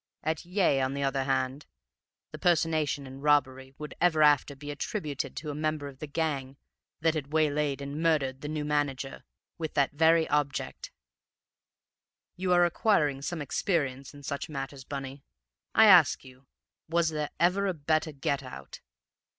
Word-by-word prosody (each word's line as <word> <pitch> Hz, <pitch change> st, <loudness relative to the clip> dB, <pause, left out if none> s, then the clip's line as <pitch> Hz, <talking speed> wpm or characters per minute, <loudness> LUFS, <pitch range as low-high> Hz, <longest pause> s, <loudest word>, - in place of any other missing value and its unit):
At 160 Hz, +1 st, -2 dB
Yea, 180 Hz, -7 st, +2 dB
on 130 Hz, +1 st, -1 dB
the 140 Hz, -, -2 dB
other 135 Hz, -1 st, 0 dB
hand, 135 Hz, +1 st, -1 dB, 0.6 s
the 155 Hz, -, -8 dB
personation 160 Hz, -5 st, +1 dB
and 135 Hz, +1 st, -10 dB
robbery 135 Hz, -2 st, +1 dB
would 150 Hz, 0 st, -7 dB
ever 160 Hz, -3 st, +4 dB
after 145 Hz, -1 st, +4 dB
be 145 Hz, +2 st, -7 dB
attributed 145 Hz, -1 st, -4 dB
to 150 Hz, -1 st, -4 dB
a -, -, -5 dB
member 155 Hz, -1 st, -2 dB
of 135 Hz, -2 st, -11 dB
the 155 Hz, -, -6 dB
gang 140 Hz, -3 st, -2 dB, 0.4 s
that 160 Hz, 0 st, +3 dB
had 145 Hz, -3 st, -4 dB
waylaid 150 Hz, -2 st, +1 dB
and 140 Hz, +2 st, -5 dB
murdered 140 Hz, -5 st, +1 dB
the 145 Hz, -, -5 dB
new 150 Hz, 0 st, -3 dB
manager 145 Hz, -2 st, -2 dB, 0.4 s
with 160 Hz, -2 st, -4 dB
that 140 Hz, -1 st, +2 dB
very 160 Hz, +2 st, +4 dB
object. 145 Hz, -2 st, -1 dB, 1.5 s
You 185 Hz, 0 st, -2 dB
are 175 Hz, 0 st, +6 dB
acquiring 165 Hz, -, +1 dB
some 155 Hz, +2 st, -3 dB
experience 140 Hz, -3 st, -1 dB
in 145 Hz, -1 st, -14 dB
such 140 Hz, +2 st, -4 dB
matters, 135 Hz, -2 st, -6 dB
Bunny. 135 Hz, 0 st, -7 dB, 0.5 s
I 220 Hz, -, +8 dB
ask 175 Hz, -8 st, +6 dB
you, 130 Hz, 0 st, -16 dB, 0.4 s
was 170 Hz, 0 st, +2 dB
there 150 Hz, -2 st, -3 dB
ever 190 Hz, +3 st, +3 dB
a 190 Hz, -, 0 dB
better 155 Hz, +1 st, 0 dB
get 140 Hz, 0 st, -2 dB
out? 65 Hz, 0 st, -10 dB
145 Hz, 160 wpm, -29 LUFS, 135-160 Hz, 1.5 s, I